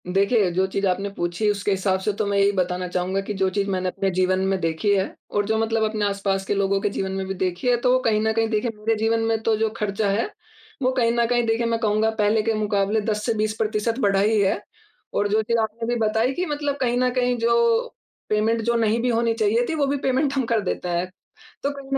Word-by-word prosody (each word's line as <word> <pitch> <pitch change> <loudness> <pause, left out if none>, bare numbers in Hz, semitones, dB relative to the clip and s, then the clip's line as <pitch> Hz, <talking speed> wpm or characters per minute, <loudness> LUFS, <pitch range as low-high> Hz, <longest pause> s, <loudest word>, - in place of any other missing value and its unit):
देखिए, 200 +2 +2
जो 185 +2 +1
चीज़ 195 +1 -2
आपने 195 +2 -1
पूछी, 175 +4 -1
उसके 200 0 -2
हिसाब 190 0 +1
से 190 +3 -1
तो - - +1
मैं 200 0 0
यही 200 0 +4
बताना 180 -1 -1
चाहूँगा 180 +2 -1
कि 200 +2 -5
जो 190 - +3
चीज़ 200 +1 -1
मैंने 185 -1 -1
अपने 195 +1 -1
जीवन 185 +1 +1
में 195 0 0
देखी 165 +4 0
है, 190 0 -1 0.2
और 205 0 0
जो 220 +1 0
मतलब 225 0 0
अपने 215 -1 -1
आस-पास 195 -1 -1
के 205 - 0
लोगों 195 0 +1
के 205 - +1
जीवन 195 -1 -3
में 190 0 -3
भी 190 - -2
देखी 185 +4 -2
है, 245 - +5
तो 250 +1 +3
कहीं 215 -2 +2
न 220 0 +1
कहीं 225 0 +1
देखिए 220 +2 0
मेरे 225 +2 0
जीवन 225 +1 +1
में 225 0 +1
तो 225 -1 +2
जो 220 0 +1
ख़र्चा 205 -1 -1
है, 205 - 0 0.5
वो 255 0 +2
कहीं 240 -3 +2
न 235 - +4
कहीं 240 0 +1
देखिए 225 +1 +1
मैं 230 0 0
कहूँगा 215 0 +2
पहले 210 +1 +3
के 225 +1 +1
मुकाबले 210 0 0
10 210 0 -2
से 230 - +1
20 215 0 0
प्रतिशत 220 +2 -1
बढ़ा 200 -5 +2
ही 215 +2 +3
है। 195 +1 +1 0.5
और 205 - +1
जो 215 +2 +2
चीज़ 230 +2 0
आपने 225 +1 -2
भी - - 0
बताई 225 +3 +1
कि 360 +6 -2
मतलब 290 -3 -2
कहीं 245 -1 +1
न 250 0 +2
कहीं 250 -1 +1
जो 235 0 +3 0.5
पेमेंट 220 +2 +1
जो 235 +1 +1
नहीं 225 0 +2
भी 250 - 0
होनी 230 -1 +1
चाहिए 225 +2 +1
थी, 320 - -1
वो 295 -2 +1
भी 285 +1 0
पेमेंट 270 +1 0
हम 270 -3 0
कर 230 -1 +1
देते 180 -2 -3
हैं, 175 +1 -1 0.5
तो 280 - 0
कहीं 275 -1 -9
215 Hz, 250 wpm, -23 LUFS, 195-230 Hz, 0.5 s, है